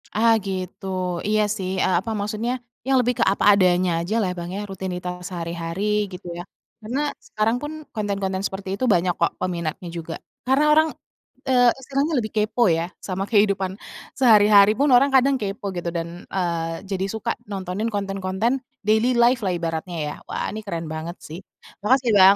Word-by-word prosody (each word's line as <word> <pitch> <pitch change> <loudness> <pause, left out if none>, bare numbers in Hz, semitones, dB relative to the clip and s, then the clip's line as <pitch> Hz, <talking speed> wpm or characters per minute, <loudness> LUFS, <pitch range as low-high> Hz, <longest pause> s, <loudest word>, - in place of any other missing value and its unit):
Ah 225 +1 +5
gitu, 185 0 -5 0.4
iya 215 0 +3 0.2
sih, 185 -1 -3 0.2
e - - +2
apa, 225 +4 -5
maksudnya 215 +4 -2 0.3
yang 270 - +4
lebih 245 0 +1
ke - - +5
apa - - -1
adanya 180 -1 +3
aja 210 +6 -2
lah 185 - 0
Bang 170 0 -5
ya, - - -3
rutinitas 180 -1 -4
sehari-hari, 170 +1 -4 0.3
gitu 180 0 -9
ya. 175 - -5 0.4
Karena, 240 +6 -3 0.3
sekarang 220 +2 +1
pun 295 +1 -4 0.2
konten-konten 195 -2 -2
seperti 195 -1 -4
itu 255 - -1
banyak 175 0 +2
kok 170 - +2
peminatnya 175 -1 -3
juga, 165 0 -5 0.3
karena 265 +3 +3
orang, 315 +1 +5 0.6
e 265 - +1 0.3
sekarang 275 +1 0
tuh 310 - +1
lebih 215 -1 -4
kepo 215 +3 +2
ya 165 0 +2 0.2
sama 190 +1 -2
kehidupan 200 -3 +3 0.5
sehari-hari 210 -4 +7
pun 285 - +3
orang 275 +3 +5
kadang 270 +1 +5
kepo 200 -1 -4
gitu, 175 -1 -5
dan, 165 0 -3 0.3
eee, 165 -2 -2
jadi 190 0 0
suka 220 +1 -3 0.2
nontonin 195 +3 -3
konten-konten 195 +5 -1 0.2
daily 220 +4 +3
life 240 +1 +4
lah 180 -1 +1
ibaratnya 170 +1 -3
ya, - - -4
wah - - -3
ini 215 - -5
keren 170 -4 -4
banget 160 +2 -5
sih. 160 +4 -8 0.4
Makasih 245 +2 +2
Bang 190 +1 +8
195 Hz, 170 wpm, -23 LUFS, 180-220 Hz, 0.6 s, Bang